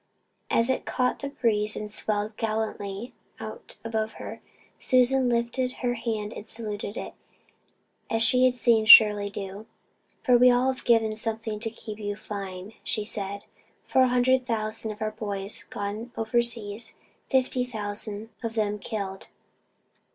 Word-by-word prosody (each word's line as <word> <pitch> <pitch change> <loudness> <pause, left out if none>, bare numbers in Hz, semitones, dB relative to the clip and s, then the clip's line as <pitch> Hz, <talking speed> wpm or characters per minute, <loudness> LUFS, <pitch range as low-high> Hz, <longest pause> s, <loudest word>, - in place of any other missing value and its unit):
As 230 - +3
it - - -1
caught 250 0 0
the 280 - -4
breeze 215 -6 +1
and 210 0 -5
swelled 210 0 -1
gallantly 215 -1 -3 0.3
out - - -8
above 220 -1 -2
her, - - -8 0.4
Susan 255 0 +3
lifted 240 +2 0
her 245 - +2
hand 225 -2 -3
and 210 - -9
saluted 215 -2 -5
it, - - -6 1.0
as 225 0 +2
she 255 +1 +5
had 255 -1 +3
seen 230 -3 +3
Shirley 210 -2 +9
do. 200 +1 -7 0.6
"We've 250 0 +7
all 255 +2 +3
given 225 -4 +2
something 220 -1 -1
to 225 +1 -2
keep 220 -1 -9
you 205 -1 -3
flying," 195 -1 -7
she 215 - -2
said. 200 -1 -4 0.4
"Four 260 -1 +4
hundred 250 +1 +2
thousand 220 -1 -1
of 215 0 -5
our 215 - -1
boys 205 -2 -4
gone 210 +4 -5
overseas 225 -1 0 0.3
fifty 260 -1 +2
thousand 210 -2 -4
of 230 -2 -4
them 210 -1 0
killed. 200 -3 -5
220 Hz, 140 wpm, -27 LUFS, 210-240 Hz, 1.0 s, Shirley